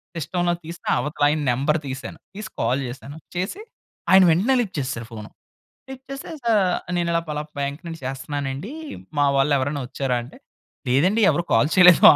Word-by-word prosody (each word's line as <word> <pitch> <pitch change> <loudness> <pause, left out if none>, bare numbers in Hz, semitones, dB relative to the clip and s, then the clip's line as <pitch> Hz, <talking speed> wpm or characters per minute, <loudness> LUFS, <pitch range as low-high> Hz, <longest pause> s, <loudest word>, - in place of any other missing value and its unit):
సిస్టమ్‌లో 175 +2 0
తీసి 170 +1 -8 0.2
అవతలాయన 150 0 +1
నంబర్ 140 +6 +1
తీశాను. 130 0 -6 0.2
తీసి 210 +2 -6
కాల్ 125 +4 +1
చేశాను. 135 +4 -8 0.2
చేసి, 185 - -3 0.5
ఆయన 190 0 +9
వెంటనే 210 +11 +3
లిఫ్ట్ 195 -5 -5
చేసేశారు 125 -4 -4
ఫోను. 105 -2 -8 0.6
లిఫ్ట్ 265 0 -9
చేస్తే 275 +3 -6
సా 235 -1 +2 0.4
"నేనిలా 170 -1 +1
పలాప్ 150 0 -4
బ్యాంక్ 140 +2 -2
నుండి 165 -1 -6
చేస్తన్నానండీ, 135 - -4 0.5
మా 145 - +4
వాళ్ళెవరైనా 140 0 +1
ఒచ్చారా?" 130 -1 -1
అంటే, 120 - -14 0.5
లేదండి. 175 - +3
ఎవరు 175 - 0
కాల్ 150 - +4
చేయలేదో. 180 -2 +9
150 Hz, 150 wpm, -23 LUFS, 135-175 Hz, 0.6 s, ఆయన